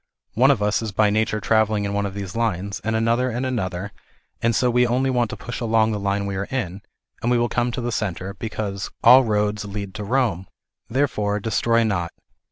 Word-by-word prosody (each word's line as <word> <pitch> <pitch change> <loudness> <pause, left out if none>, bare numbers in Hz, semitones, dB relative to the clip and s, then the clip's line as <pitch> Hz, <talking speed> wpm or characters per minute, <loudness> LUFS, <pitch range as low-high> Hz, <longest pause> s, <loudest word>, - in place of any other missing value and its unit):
One - - +4
of 105 - +3
us 105 +2 +1
is 110 -2 -4
by 105 +1 +3
nature 110 0 +1
travelling 110 -1 +2
in 100 - -2
one 100 0 0
of 95 - -8
these 100 -1 -6
lines, 100 -3 -2
and 110 0 -1
another 115 +3 +1
in 125 +2 -2
another, 95 -6 -3 0.5
and 115 0 +2
so 125 +1 +2
we 125 +1 +3
only 130 +3 +1
want 120 -3 +1
a - - -6
push 120 - -6
along 110 -1 +2
the 105 - -2
line 100 0 -1
we 100 -1 -3
are 100 - -3
in, 100 -7 -3 0.4
and 120 - 0
we 125 - +3
will 120 0 +2
come 120 0 0
to 125 - -4
the 120 0 -2
centre, 100 -3 -3
because 100 -2 -4
"all 125 +3 +8
roads 105 -2 0
lead 100 -1 -6
,to 105 -1 -5
Home." 115 -7 0 0.4
Therefore, 110 -6 0
destroy 115 +2 +1
not. 90 -6 -1
110 Hz, 215 wpm, -22 LUFS, 100-120 Hz, 0.5 s, all